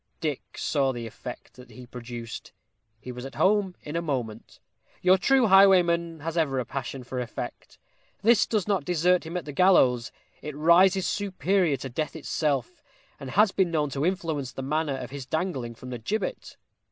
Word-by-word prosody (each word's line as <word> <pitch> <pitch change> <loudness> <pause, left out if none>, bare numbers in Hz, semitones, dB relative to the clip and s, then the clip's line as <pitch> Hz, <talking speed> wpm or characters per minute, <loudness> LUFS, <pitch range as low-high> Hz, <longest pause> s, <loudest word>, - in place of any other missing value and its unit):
Dick 150 -4 -4
saw 140 -3 +1
the 120 -2 -6
effect 115 - -9
that 125 -1 -13
he 125 +2 -12
produced. 120 -1 -8 0.5
He 125 - -8
was 125 0 -8
at 135 - -8
home 195 -2 +2
in 150 - -6
a 170 - 0
moment. 125 -9 -4 0.4
Your 185 +1 +6
true 255 +7 +3
highwayman 175 -5 +4
has 165 +2 -4
ever 140 -4 0
a 125 - -1
passion 135 0 -5
for 125 +1 -5
effect. 120 -3 -7 0.5
This 225 0 +5
does 210 -4 -1
not 200 -3 +1
desert 180 0 +2
him 170 +2 -4
at 180 - -5
the 150 - -6
gallows; 135 -8 +4 0.3
it 150 -1 -7
rises 180 +4 +5
superior 190 -5 0
to 135 - -6
death 150 +6 -3
itself, 145 -4 -2 0.4
and 135 - -7
has 205 - +4
been 190 -3 +1
known 150 -3 0
to 135 +2 -2
influence 160 -7 -1
the 135 - -6
manner 150 0 -1
of 125 -1 -7
his 135 -2 -7
dangling 135 -8 -2
from 125 +2 -10
the 120 - -5
gibbet! 215 - -4
155 Hz, 180 wpm, -26 LUFS, 130-180 Hz, 0.5 s, Your